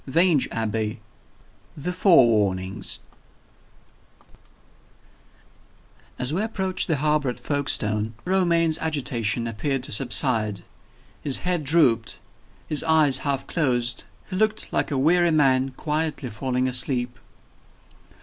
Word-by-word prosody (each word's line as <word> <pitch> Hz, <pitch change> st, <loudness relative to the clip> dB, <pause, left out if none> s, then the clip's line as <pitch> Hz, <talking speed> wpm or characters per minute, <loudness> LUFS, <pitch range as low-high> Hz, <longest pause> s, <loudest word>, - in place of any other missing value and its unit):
VANGE 165 Hz, 0 st, +3 dB
ABBEY. 110 Hz, 0 st, -3 dB, 0.8 s
THE 180 Hz, +5 st, -4 dB
FOREWARNINGS 105 Hz, -, +2 dB
VI. -, -, -33 dB, 1.9 s
As 125 Hz, +3 st, -2 dB
we 185 Hz, -, 0 dB
approached 190 Hz, -4 st, -2 dB
the 160 Hz, -, +1 dB
harbor 150 Hz, -1 st, 0 dB
at 125 Hz, -, -6 dB
Folkestone, 110 Hz, -7 st, -1 dB
Romayne's 170 Hz, -4 st, +2 dB
agitation 125 Hz, -7 st, -1 dB
appeared 125 Hz, +4 st, -3 dB
to -, -, -2 dB
subside. 110 Hz, -4 st, +1 dB, 0.6 s
His 140 Hz, -3 st, +1 dB
head 180 Hz, -3 st, 0 dB
drooped; 135 Hz, -, +2 dB, 0.5 s
his 150 Hz, -, +1 dB
eyes 155 Hz, -5 st, +4 dB
half 140 Hz, -1 st, -2 dB
closed 125 Hz, -6 st, -1 dB, 0.3 s
he -, -, -3 dB
looked 215 Hz, +1 st, 0 dB
like -, -, 0 dB
a 140 Hz, -, -2 dB
weary 170 Hz, +5 st, +3 dB
man 135 Hz, -4 st, +2 dB
quietly 150 Hz, -1 st, -3 dB
falling 125 Hz, +4 st, -2 dB
asleep. 125 Hz, -1 st, 0 dB
135 Hz, 110 wpm, -23 LUFS, 120-160 Hz, 1.9 s, eyes